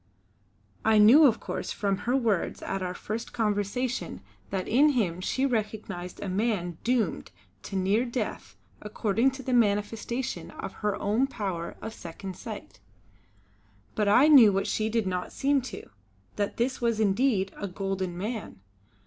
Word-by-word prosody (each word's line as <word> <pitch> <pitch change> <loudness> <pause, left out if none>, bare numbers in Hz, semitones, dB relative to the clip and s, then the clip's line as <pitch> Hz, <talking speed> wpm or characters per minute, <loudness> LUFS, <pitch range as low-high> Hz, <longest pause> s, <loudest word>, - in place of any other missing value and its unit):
I 220 0 +4
knew 250 +9 +8
of 230 -3 +1
course - - -4
from 200 -2 -1
her 250 - +3
words 220 -8 0
at 195 - -3
our 180 0 -3
first 220 +5 -5
conversation 220 +3 -1 0.3
that 190 -2 -3
in 290 +5 +4
him 185 -8 0
she 260 +8 0
recognised 215 -7 -3
a - - -4
man 185 -4 -1
doomed 235 -6 0 0.3
to 195 - -7
near 195 +5 +2
death 240 -3 -4 0.3
according 215 +3 +1
to 265 0 -8
the 255 - -2
manifestation 225 +2 0
of - - -7
her 210 -1 0
own 220 +7 +1
power 190 -9 -4
of 220 - -5
Second 185 +2 -8
Sight; - - -9 1.1
but 210 - 0
I 245 +8 +6
knew 260 -9 +8
what 195 0 0
she 215 0 0
did 225 -1 0
not 180 -1 -3
seem 280 0 +1
to, - - -9 0.5
that 205 -1 -2
this 250 +2 -1
was 230 -2 +1
indeed 205 -1 +2
a 200 - -4
golden 190 -1 -3
man. 215 +4 -5
215 Hz, 155 wpm, -27 LUFS, 195-240 Hz, 1.1 s, knew